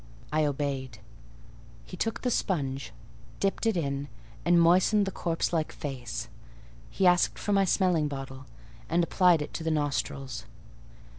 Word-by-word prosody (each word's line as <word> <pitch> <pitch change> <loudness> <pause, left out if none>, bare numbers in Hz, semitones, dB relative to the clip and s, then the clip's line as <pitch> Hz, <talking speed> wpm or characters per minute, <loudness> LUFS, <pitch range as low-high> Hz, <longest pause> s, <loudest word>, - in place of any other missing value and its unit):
I 155 0 +3
obeyed. 135 -4 -2 0.9
He - - -9
took 225 - -2
the 250 - +1
sponge, 135 - -1 0.5
dipped 195 +3 0
it 220 -5 +2
in, 140 -3 -2 0.4
and 175 +1 +5
moistened 185 +5 +4
the 195 - -3
corpse 170 -1 -1
like 160 -2 0
face; 130 -5 -5 0.6
he 190 - 0
asked 180 -1 +4
for 205 - -1
my 195 -1 +4
smelling 180 -5 +2
bottle, 135 -2 -7 0.4
and 170 +1 +3
applied 175 -2 +4
it - - -9
to 165 - -4
the 160 - 0
nostrils. 135 -5 -2
155 Hz, 145 wpm, -28 LUFS, 135-180 Hz, 0.9 s, and